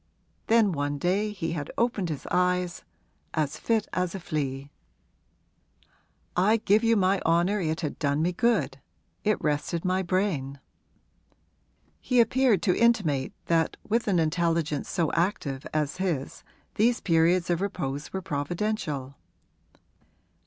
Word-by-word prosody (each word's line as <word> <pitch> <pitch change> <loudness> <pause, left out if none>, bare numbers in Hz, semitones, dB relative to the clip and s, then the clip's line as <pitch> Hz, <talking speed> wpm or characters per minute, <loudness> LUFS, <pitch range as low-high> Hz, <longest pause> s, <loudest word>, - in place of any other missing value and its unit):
Then 225 -3 +4
one 145 -2 -2
day 190 +7 +1
he 170 -5 -3
had 150 -4 -4
opened 220 -7 0
his 150 -4 -5
eyes 180 -1 +1 0.5
as 155 -2 -1
fit 225 -2 0
as 180 0 -1
a - - -4
flea! 140 -4 -3 1.6
'I 205 +5 +4
give 215 +1 +2
you 230 -1 +4
my 190 0 +2
honour 175 +5 +2
it 160 -1 -1
had 150 -4 -4
done 145 +1 +1
me 175 - +1
good 185 - 0 0.4
it 215 0 +1
rested 150 +3 -1
my 185 +1 +1
brain.' 170 -8 -1 1.4
He 250 -1 +1
appeared 235 -4 +3
to 180 - +3
intimate 185 - +2
that 165 -1 +1
with 225 +2 0
an 195 -3 +2
intelligence 165 -2 0
so 165 -3 0
active 165 -7 -1
as 150 -2 -1
his 170 -8 -3 0.3
these 235 +3 +2
periods 170 +1 +2
of 170 +1 0
repose 155 -8 -3
were 190 -1 -4
providential. 150 -3 -2
175 Hz, 130 wpm, -27 LUFS, 150-205 Hz, 1.6 s, Then